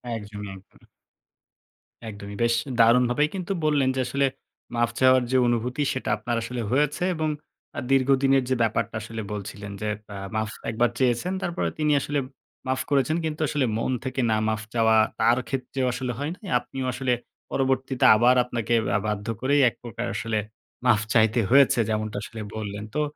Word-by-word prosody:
একদমই, 105 -2 -7
একদমই। 95 0 -19 1.2
একদমই। 100 -1 -8
বেশ 115 0 +3 0.3
দারুণভাবেই 125 +5 +4
কিন্তু 185 0 -4
বললেন 145 -4 +3
যে, - - -1
আসলে 140 +3 +1 0.5
মাফ 120 0 +2
চাওয়ার 130 -1 +5
যে 130 - +4
অনুভূতি, 120 +4 0
সেটা 130 -4 -4
আপনার 120 +3 -2
আসলে 120 +1 -4
হয়েছে 150 +6 +1
এবং 155 -1 -1 0.5
আ - - 0
দীর্ঘদিনের 135 0 +4
যে 130 - +2
ব্যাপারটা 110 0 -1
আসলে 110 +1 -6
বলছিলেন 100 0 -6
যে, 105 - -1 0.2
আ 100 - -6 0.2
মাফ 110 -1 -1 0.2
১ - - -4
বার 120 - +4
চেয়েছেন, 130 +8 +1
তারপরে 175 - -1
তিনি 150 0 +2
আসলে 145 0 -1 0.5
মাফ 130 0 0
করেছেন। 145 +3 +2
কিন্তু 155 0 -3
আসলে, 140 -3 0
মন 115 - -1
থেকে 130 0 -1
না 110 - +3
মাফ 110 -1 -1
চাওয়া, 110 -1 +4 0.2
তার 115 +2 +4
ক্ষেত্রেও 135 0 -2
আসলে 125 0 -3
হয় 145 +3 -2
নাই। 200 - -12
আপনিও 130 +2 -6
আসলে 130 -2 0 0.4
পরবর্তীতে 130 -1 0
আবার 120 +3 +5
আপনাকে 120 -1 -2 0.2
আ - - +5
বাধ্য 105 0 -3
করেই, 140 +3 +3
১ - - -18
প্রকার 120 -4 -5
আসলে 115 -2 -1 0.5
মাফ 110 -4 +4
চাইতে 110 +1 +4
হয়েছে, 135 -1 +5
যেমনটা 110 -1 -2
আসলে 110 - -7
বললেন। 105 -1 -5
তো 150 - +2
125 Hz, 170 wpm, -25 LUFS, 110-135 Hz, 1.2 s, চাওয়ার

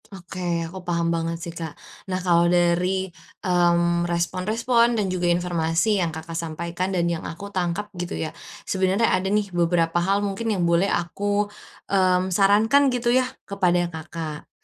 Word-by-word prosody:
Oke, 175 -3 -4
aku 185 +3 -8
paham 170 -1 0
banget 165 0 -2
sih, 170 0 -7
Kak. 165 -2 -7 0.3
Nah, 185 - 0
kalau 170 -1 +4
dari, 180 +2 +2 0.4
mmm, 175 -1 +2
respon-respon 225 +8 +1
dan 210 - +1
juga 175 -1 0
informasi 175 +3 +1
yang 170 - +1
Kakak 160 +1 -7
sampaikan 170 +2 -3
dan 180 -3 0
yang 170 -1 -1
aku 200 +4 -7
tangkap 180 +2 -1
gitu 175 -1 -4
ya, 155 - -4 0.3
sebenarnya 190 +4 +1
ada 190 +1 +1
nih 205 -2 0
beberapa 170 0 +2
hal 200 +3 +1
mungkin 200 +3 -3
yang 185 -4 0
boleh 170 +3 +3
aku, 205 +4 0 0.5
mmm, 185 -1 +2
sarankan 215 +9 +4
gitu 240 -1 +1
yah 255 0 +3 0.2
kepada 180 -3 +1
Kakak. 160 -1 -7
180 Hz, 155 wpm, -24 LUFS, 170-200 Hz, 0.5 s, kalau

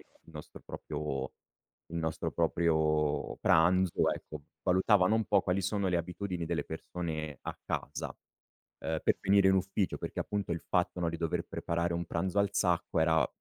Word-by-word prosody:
il - - -18 0.3
nostro 75 -1 -10
proprio 75 -3 -4 0.6
il 85 - -4
nostro 80 0 -2
proprio 80 -3 +1
pranzo, 90 +2 +4
ecco, 75 -1 -8 0.2
valutavano 95 +2 +4
un 110 - +2
po' - - +3
quali 95 +1 0
sono 100 +1 0
le 90 - +2
abitudini 90 +1 -3
delle - - -1
persone 80 -5 -5
a - - -5
casa, - - -4 0.6
ehm, 80 0 -2
per - - +3
venire 100 -1 +5
in 95 - +5
ufficio, 95 +1 0
perché - - -4
appunto 100 -4 -2
il 85 - -3
fatto, 90 0 +1
no, 85 - +1
di 85 - -3
dover 80 -1 -1
preparare 85 +1 -1
un 85 0 -2
pranzo 95 +4 -1
al 100 -1 +1
sacco 90 -4 +1
era 80 0 +4
85 Hz, 165 wpm, -31 LUFS, 80-95 Hz, 0.6 s, venire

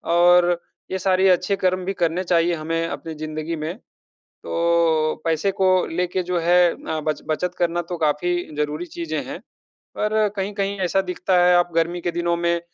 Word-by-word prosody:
और 175 0 +5 0.3
ये 190 - -1
सारे 190 +1 +3
अच्छे 180 +2 +2
कर्म 185 0 0
भी 195 - -1
करने 170 +3 +1
चाहिए 170 0 +2
हमें 165 +1 -2
अपनी 165 -1 -6
ज़िन्दगी 155 +1 -4
में। 155 +3 -4 0.7
तो 165 -2 +1
पैसे 165 +4 +1
को 190 0 +1 0.2
लेके 180 +2 -1
जो 180 0 -1
है 175 +1 +4
अ, 160 - -5
ब 155 0 -1
बचत 175 +3 -1
करना 175 0 +1
तो 175 - -3
काफ़ी 160 +3 0 0.2
ज़रूरी 150 +3 -2
चीज़ें 335 - -4
हैं। - - -7 0.6
पर 210 0 -1 0.2
कहीं-कहीं 200 0 -2
ऐसा 195 +2 +2
दिखता 180 0 -1
है 180 - +5
आप 175 0 +2
गर्मी 170 +1 0
के 175 - -1
दिनों 170 0 0
में 170 0 +1
175 Hz, 175 wpm, -22 LUFS, 165-180 Hz, 0.7 s, और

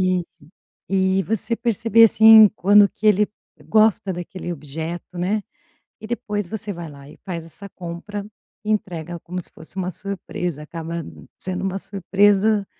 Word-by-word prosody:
e 180 - -1 0.7
e 190 0 +2
você 225 +1 -1
perceber 230 0 +3
assim 220 0 +8
quando 205 +2 +6
que 215 - -2
ele 210 0 +4 0.4
gosta 215 -3 +3
daquele 175 +1 -6
objeto, 160 +4 -7
né, 200 +4 0 0.6
e 215 - -8
depois 210 -5 -3
você 210 0 -3
vai 170 -3 -8
lá 140 -1 -13
e 155 - -14
faz 170 -3 -5
essa 200 +5 -9
compra, 185 +3 -7 0.4
entrega 175 -6 -3
como 180 +1 -6
se - - -7
fosse 160 +3 -8
uma 185 -1 -2
surpresa, 180 -4 -4
acaba 165 +1 -7 0.4
sendo 185 0 0
uma 195 0 -2
surpresa, 200 +2 +2
195 Hz, 145 wpm, -21 LUFS, 175-210 Hz, 0.7 s, assim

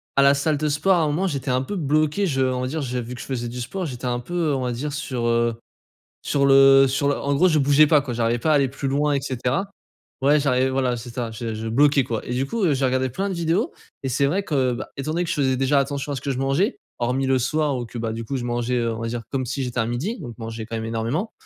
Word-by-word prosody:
à 140 - +5
la 140 +1 +6
salle 145 +1 0
de 150 +1 0
sport, 150 +6 +2
à - - +2
un 155 - +2
moment, 160 +6 0
j'étais 140 -6 -2
un 130 +1 +1
peu 205 - -5
bloqué. 155 +3 +1
Je 135 -5 0
on 130 -1 0
va 130 - -1
dire, 155 +4 -3
j'ai 125 -1 -2
vu 120 +2 -7
que - - -8
je - - -7
faisais 120 -3 -3
du 125 +1 -6
sport, 175 +8 -4
j'étais 125 -1 -7
un 120 0 0
peu, 125 +8 -9 0.2
heu, 140 - +1
on 130 - -2
va 125 -1 -1
dire 140 +5 -4
sur, 130 -4 -3
heu, 115 0 +2 0.7
sur 140 -1 +1
le 135 0 +7
sur 140 +2 0
le 145 - +1
en 140 0 -1
gros, 180 +6 +4
je 155 -3 +3
bougeais 145 +2 +5
pas, 150 -1 +5
quoi, 130 -3 -5
j'arrivais 115 0 0
pas 155 - +1
à - - +5
aller 140 -3 +3
plus 135 +1 -4
loin 145 +2 +1
et 140 - 0
cetera. 130 +8 -2 0.5
Ouais, 145 +3 +4
j'arrivais 130 -2 +2
voilà, 130 -2 0
j 115 - -7
c'est 120 - -9
ça, 120 -2 -2
je 110 0 -5
je 110 +1 -5
bloquais, 140 +3 +4
quoi. 115 -3 -3
Et 125 - -3
du 130 +2 0
coup, 225 +7 -2
heu, 155 - +3
j'ai 135 0 +1
regardé 130 0 +1
plein 195 +10 -2
de - - -2
vidéos, 170 - 0 0.3
et - - -1
c'est 140 +3 +2
vrai 195 +7 0
que, 135 -7 +1
bah, 120 - -5
étant 145 +3 -3
donné 175 +2 0
que - - -6
je - - -1
faisais 130 -3 +1
déjà 135 +2 +2
attention 140 +1 -2
à - - -2
ce 130 - -5
que 140 - -2
je 130 - -3
mangeais, 140 - +1 0.2
hormis 125 +3 0
le 130 - +3
soir 145 +1 0
ou 120 - -4
que, 120 - -9
bah, 115 -1 -2
du 115 0 -5
coup, 135 +4 -3
je 125 - -4
mangeais, 120 +1 -1
heu, 115 -1 0
on - - -7
va 115 - -2
dire 120 +1 -3
comme 130 -2 -1
si 135 +3 -3
j'étais 125 -1 -3
à 115 - +2
midi, 145 - -2
donc 120 -8 -8
manger 115 0 -6
quand 115 - -6
même 110 - -4
énormément. 115 - -2
135 Hz, 310 wpm, -23 LUFS, 120-145 Hz, 0.7 s, le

